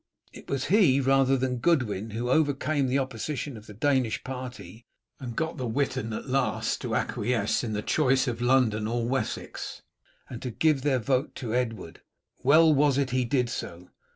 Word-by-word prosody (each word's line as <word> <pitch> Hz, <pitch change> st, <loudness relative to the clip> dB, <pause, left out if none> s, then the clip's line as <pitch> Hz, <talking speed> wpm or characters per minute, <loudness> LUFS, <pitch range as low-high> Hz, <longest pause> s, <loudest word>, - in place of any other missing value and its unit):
It -, -, -13 dB
was 135 Hz, -1 st, -1 dB
he 175 Hz, -8 st, +4 dB
rather 135 Hz, 0 st, +3 dB
than 125 Hz, -1 st, -1 dB
Godwin 115 Hz, -, +1 dB
who 120 Hz, +3 st, -3 dB
overcame 145 Hz, -1 st, +1 dB
the 130 Hz, +2 st, +1 dB
opposition 135 Hz, +1 st, -3 dB
of 110 Hz, -1 st, -12 dB
the 105 Hz, -, -10 dB
Danish 130 Hz, -1 st, +1 dB
party, 125 Hz, -3 st, -8 dB, 0.3 s
and 120 Hz, -4 st, -6 dB
got 160 Hz, 0 st, -2 dB
the 125 Hz, -, -3 dB
Witan 130 Hz, -1 st, -1 dB
at 110 Hz, -, -5 dB
last 130 Hz, -5 st, 0 dB
to -, -, -2 dB
acquiesce 110 Hz, 0 st, 0 dB
in 110 Hz, -3 st, -3 dB
the 105 Hz, 0 st, -2 dB
choice 135 Hz, -3 st, +2 dB
of 120 Hz, -1 st, -3 dB
London 120 Hz, -4 st, +2 dB
and 120 Hz, +1 st, -1 dB
Wessex, 135 Hz, -, -4 dB, 0.4 s
and 120 Hz, -2 st, -8 dB
to 125 Hz, -, -4 dB
give 150 Hz, +3 st, +1 dB
their 135 Hz, -1 st, +2 dB
vote 130 Hz, +3 st, -1 dB
to 115 Hz, -4 st, -4 dB
Edward. 115 Hz, -8 st, -3 dB, 0.4 s
"Well 155 Hz, +4 st, +6 dB
was 140 Hz, -1 st, +3 dB
it 135 Hz, -2 st, 0 dB
he 130 Hz, 0 st, +1 dB
did 125 Hz, 0 st, +1 dB
so. 90 Hz, -6 st, -7 dB
130 Hz, 180 wpm, -27 LUFS, 115-140 Hz, 0.4 s, Well